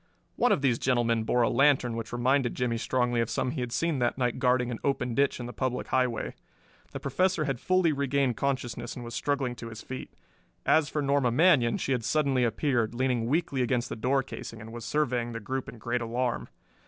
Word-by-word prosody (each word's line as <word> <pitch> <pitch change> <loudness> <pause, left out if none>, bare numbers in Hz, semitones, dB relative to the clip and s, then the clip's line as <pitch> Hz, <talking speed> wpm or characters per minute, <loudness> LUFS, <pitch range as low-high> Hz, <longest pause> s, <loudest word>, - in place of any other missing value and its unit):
One - - +3
of 140 - +2
these 125 -4 +2
gentlemen 115 -3 +1
bore 120 +1 +2
a - - +3
lantern 135 -4 +3
which 115 0 -5
reminded 125 +1 +1
Jimmie 120 -2 -1
strongly 125 -1 +1
of 115 - -1
some 125 - -1
he 135 -2 -3
had 125 -1 -3
seen 165 +1 0
that 120 0 0
night 125 -1 0
guarding 125 -1 +2
an 115 - -4
open 125 -3 0
ditch 140 +2 +1
in 120 - -5
the 120 - -7
public 130 -1 -2
highway. 125 -3 0 0.6
The - - -5
Professor 175 +5 +1
had 135 -4 -2
fully 185 0 +2
regained 140 -2 +1
consciousness 120 -3 -2
and 120 - -7
was 120 - -7
struggling 135 -2 -1
to 115 - -7
his 115 0 -9
feet. 130 - -7 0.5
As 155 -2 +4
for 150 -1 -1
Norma 140 -2 +2
Manion, 130 -3 +4
she - - -3
had 125 -3 0
suddenly 140 -2 +2
appeared, 120 -1 0
leaning 125 -2 0
weakly 140 -1 0
against 125 0 0
the - - -4
door 130 +4 +1
casing, 115 -3 -8
and 110 0 -10
was 120 -1 -7
surveying 125 -6 0
the 115 - -4
group 130 +4 -4
in 120 - -10
great 120 +2 -2
alarm. 120 +1 -2
125 Hz, 215 wpm, -28 LUFS, 120-140 Hz, 0.6 s, As